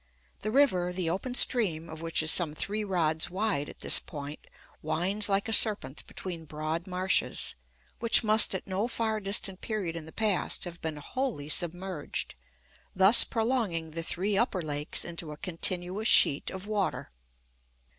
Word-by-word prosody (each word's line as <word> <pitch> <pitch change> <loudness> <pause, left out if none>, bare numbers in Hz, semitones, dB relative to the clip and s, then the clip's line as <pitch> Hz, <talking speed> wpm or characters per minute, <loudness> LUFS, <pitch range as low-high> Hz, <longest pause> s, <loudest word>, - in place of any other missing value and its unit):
The 215 - -3
river, 215 -9 +2
the 180 -2 -2
open 245 +8 -4
stream 180 -12 +3
of 160 -1 -9
which 165 -1 0
is 160 - +6
some 160 -4 +2
three 210 +6 -3
rods 160 -5 0
wide 190 -6 -2
at - - -13
this - - +3
point, 145 -1 -8 0.4
winds 190 +7 -1
like 200 +2 +1
a 225 - -1
serpent 210 - +4
between 170 -4 -6
broad 155 +4 -4
marshes, 185 +1 +1 0.5
which 230 +1 +5
must 215 -2 +5
at 190 - -5
no 195 +4 -2
far 220 -2 -2
distant 195 -1 -2
period 200 -7 -4
in 160 -2 -7
the - - -10
past 210 -2 -1
have 175 -1 -8
been 160 -2 -4
wholly 205 - -4
submerged, 175 -1 -2 0.6
thus 190 +5 +8
prolonging 220 -9 -2
the 165 +1 -4
three 190 +5 -2
upper 195 -4 0
lakes 150 0 -4
into 170 -2 -6
a 150 - -9
continuous 180 +5 -2
sheet 140 -9 +5
of 190 +1 -8
water. 205 - -3
185 Hz, 160 wpm, -28 LUFS, 160-210 Hz, 0.6 s, thus